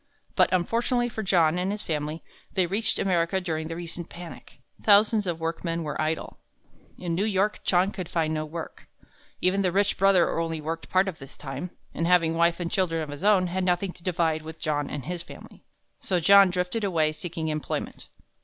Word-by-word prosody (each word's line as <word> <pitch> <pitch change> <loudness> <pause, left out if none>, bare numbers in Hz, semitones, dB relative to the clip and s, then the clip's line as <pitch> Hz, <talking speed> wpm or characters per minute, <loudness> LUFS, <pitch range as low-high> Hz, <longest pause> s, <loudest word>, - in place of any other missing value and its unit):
But - - +4
unfortunately 235 +7 +1
for 220 - -4
John 175 -4 +3
and 185 +1 -1
his 210 +1 -3
family, 155 0 -3 0.3
they 185 - +2
reached 205 +5 0
America 180 0 +1
during 160 -3 -3
the 165 - -5
recent 170 0 -7
panic. 175 -1 -11 0.3
Thousands 210 0 +5
of 170 -2 -2
workmen 165 +1 -2
were 150 -1 -3
idle. 155 +1 -3 0.6
In 175 -2 -3
New 180 +4 +1
York, 210 0 +1
John 185 +2 +2
could 185 -5 -6
find 160 -2 0
no 155 0 -1
work. 160 +2 -8 0.5
Even 190 +2 +2
the 185 -2 +1
rich 200 +2 +1
brother 190 -4 +4
only 165 -1 -2
worked 165 +2 -5
part 190 +1 +3
of 185 -4 -5
the 135 - -9
time, 140 +5 -7 0.2
and 165 - -1
having 170 -2 +4
wife 170 +1 +2
and 170 -1 -3
children 165 -4 0
of 150 - -7
his 145 +4 -7
own, 200 -3 +4
had 185 +1 -2
nothing 180 +1 +1
to - - -15
divide 165 -3 0
with 160 +1 -9
John 145 -2 -1
and 140 -4 -5
his 175 -1 -4
family. - - -13 0.4
So 185 -2 0
John 200 +3 +7
drifted 180 +5 -2
away 165 -6 +2
seeking 160 0 -4
employment. 155 -1 -4
175 Hz, 195 wpm, -26 LUFS, 160-190 Hz, 0.6 s, John